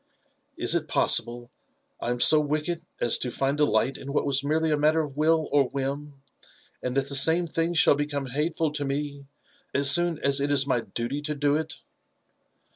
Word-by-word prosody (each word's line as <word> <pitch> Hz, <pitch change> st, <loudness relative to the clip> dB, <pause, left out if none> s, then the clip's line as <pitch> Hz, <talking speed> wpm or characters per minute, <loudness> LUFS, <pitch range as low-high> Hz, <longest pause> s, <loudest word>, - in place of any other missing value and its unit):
Is -, -, +1 dB
it -, -, -1 dB
possible 120 Hz, +1 st, 0 dB, 0.5 s
that -, -, -5 dB
I -, -, -1 dB
am 120 Hz, 0 st, -2 dB
so 155 Hz, +5 st, +6 dB
wicked 155 Hz, +3 st, -2 dB, 0.2 s
as 120 Hz, -, +1 dB
to 125 Hz, -, -3 dB
find 135 Hz, +3 st, -2 dB
delight 150 Hz, -2 st, 0 dB
in 140 Hz, -, -8 dB
what -, -, 0 dB
was 140 Hz, -1 st, +1 dB
merely 160 Hz, +2 st, 0 dB
a -, -, +3 dB
matter 155 Hz, +2 st, +2 dB
of 145 Hz, -3 st, -7 dB
will 155 Hz, +1 st, +1 dB
or 145 Hz, -1 st, +3 dB
whim, 140 Hz, +1 st, -5 dB, 0.6 s
and 125 Hz, +1 st, -4 dB
that 135 Hz, 0 st, 0 dB
the 140 Hz, -, -2 dB
same 165 Hz, +5 st, +6 dB
thing 165 Hz, +1 st, -2 dB
shall 165 Hz, -, +5 dB
beconae 145 Hz, -2 st, -4 dB
hateful 155 Hz, +2 st, -1 dB
to 145 Hz, -1 st, -3 dB
me 140 Hz, 0 st, -5 dB, 0.5 s
as 140 Hz, 0 st, +3 dB
soon 175 Hz, -2 st, +3 dB
as 140 Hz, -1 st, +3 dB
it 145 Hz, +1 st, -1 dB
is 140 Hz, -1 st, +4 dB
my 130 Hz, -3 st, 0 dB
duty 120 Hz, +6 st, -5 dB
to 150 Hz, 0 st, -4 dB
do 145 Hz, 0 st, 0 dB
it?" 160 Hz, 0 st, -5 dB
145 Hz, 200 wpm, -25 LUFS, 135-155 Hz, 0.6 s, so